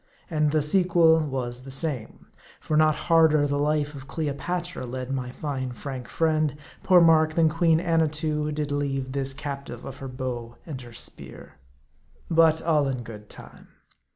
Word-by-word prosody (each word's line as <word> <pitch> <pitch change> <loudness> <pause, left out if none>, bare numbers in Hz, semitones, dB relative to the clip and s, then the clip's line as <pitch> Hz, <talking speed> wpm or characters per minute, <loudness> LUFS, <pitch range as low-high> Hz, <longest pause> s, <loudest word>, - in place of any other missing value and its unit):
And 150 -2 +2
the 155 0 +2
sequel 170 -1 +4
was 130 -5 -3
the 135 - -11
same. 135 -4 -3 0.3
For 155 - -2
not 155 0 +4
harder 160 -3 +5
the 145 0 0
life 150 0 0
Cleopatra 165 +3 -3
led 130 +1 -5
my 130 -2 -2
fine 130 -1 -4
frank 130 0 -6
friend, 155 -3 +1 0.2
poor 185 -2 +6
Mark, 160 -1 +5
than 165 -2 +4
Queen 165 0 +3
Annatoo 155 -2 0
did 150 -1 -3
lead 135 -2 -2
this 135 -1 -1
captive 140 -3 -6
of 135 - -7
her 135 - -7
bow 125 -2 -5
and 140 -6 -6
her 120 -1 -11
spear. - - -9 0.7
But 160 -1 +4
all 155 -4 +2
in. 130 -3 -3
good 105 -2 -10
time. - - -10
150 Hz, 155 wpm, -25 LUFS, 130-160 Hz, 0.7 s, poor